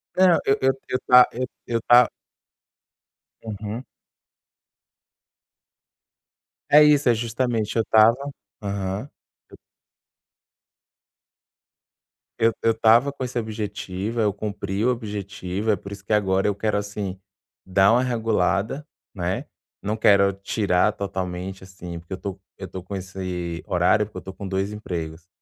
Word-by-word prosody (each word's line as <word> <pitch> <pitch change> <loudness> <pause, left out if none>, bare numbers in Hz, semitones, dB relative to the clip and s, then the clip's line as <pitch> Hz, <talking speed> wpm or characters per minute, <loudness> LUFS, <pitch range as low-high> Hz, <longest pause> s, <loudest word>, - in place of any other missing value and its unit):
Não. 185 -2 +5
Eu 135 - +3
eu 135 0 +4 0.2
eu 130 - 0
tá 125 0 +8
eu 130 +2 -2 0.2
eu 115 -1 -1
tá 120 +1 +6 1.3
Uhum. 110 +2 -5 2.9
É 150 +1 +8
isso. 145 -3 +5
É - - +6
justamente 115 -1 -1
Eu 115 - +4
estava 110 +2 +5 0.4
Aham. 100 +4 -3 0.4
Eu - - -14 2.8
Eu 115 0 +4
eu 115 - +3
estava 115 +4 +4
com 140 -1 -6
esse 125 -1 -4
objetivo. 105 -1 -4
Aí, 110 - +3
eu 105 - +1
cumpri 100 0 -3
o - - +4
objetivo. 100 -3 -3
É - - +3
por 100 +2 -10
isso 100 -1 -9
que - - -1
agora 95 -2 +2
eu 105 - +2
quero, 105 0 0
assim, 100 -2 -4 0.5
dar 95 +2 +4
uma 120 +2 +4
regulada, 115 +1 0 0.3
né. 90 -2 -2 0.4
Não 105 +2 -2
quero 100 -2 +4
tirar 100 0 +1
totalmente, 95 -2 -5
assim, 90 -2 -8
porque 85 +3 -9
eu - - -4
tô 100 0 -6 0.2
eu 95 - -7
tô 95 - -7
com 95 +2 -7
esse 90 -3 -5
horário, 90 +4 +3
porque 105 -2 -12
eu - - -5
tô 95 - -9
com 100 - -7
2 95 +2 -2
empregos. 85 -5 -6
105 Hz, 140 wpm, -23 LUFS, 95-115 Hz, 2.9 s, tá